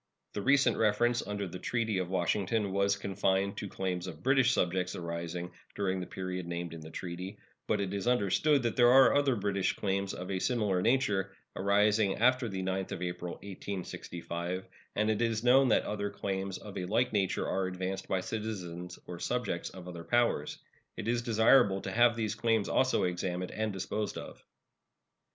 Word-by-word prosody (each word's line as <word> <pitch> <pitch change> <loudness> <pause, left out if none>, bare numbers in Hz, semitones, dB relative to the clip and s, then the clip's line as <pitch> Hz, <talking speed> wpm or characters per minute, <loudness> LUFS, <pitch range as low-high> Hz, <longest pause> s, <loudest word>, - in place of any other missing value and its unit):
The 105 - -3
recent 135 0 +4
reference 120 +3 +2
under 100 -1 -3
the 90 +1 -7
treaty 110 -2 -1
of 90 -1 -2
Washington 95 +3 0
was 100 +1 +2
confined 95 0 0
to 100 - -4
claims 90 -1 -3
of 80 -3 -9
British 135 -1 +4
subjects 90 -4 0
arising 85 +1 -4 0.2
during 95 -2 0
the 90 - -5
period 90 -1 -4
named 85 -1 -4
in 80 - -8
the 80 - -9
treaty; 90 +3 -6 0.3
but - - +1
it 100 -1 -2
is 100 +3 -3
understood 125 +5 +3
that 115 - 0
there 120 -1 +6
are 135 +1 +7
other 140 -3 +3
British 100 -2 0
claims 100 0 -1
of 90 +2 -6
a 95 - -1
similar 105 -5 +1
nature, 105 -5 +1 0.2
arising 105 +1 +3
after 125 0 +3
the 95 -1 -3
9th 95 0 -2
of 90 - -4
April, 90 0 -4
1865, 90 -2 -5 0.3
and 105 +1 +2
it 110 - -1
is 115 -1 0
known 130 +2 +6
that 115 - +3
other 100 -1 -2
claims 95 -1 -3
of 105 -2 -7
a 90 - -3
like 120 +7 +1
nature 100 -3 0
are 95 -1 0
advanced 95 +1 -4
by 95 - 0
citizens 90 -5 -5
or 90 -1 -7
subjects 120 -7 -2
of 90 -1 -11
other 85 -2 -7
powers. 120 -9 +1 0.4
It - - -5
is 120 0 +1
desirable 110 -3 +4
to - - -4
have 120 0 +4
these 110 -2 -1
claims 115 -2 +1
also 130 0 +2
examined 90 0 -2
and 110 0 -2
disposed 100 +2 -3
of. - - -9
100 Hz, 180 wpm, -31 LUFS, 90-110 Hz, 0.4 s, are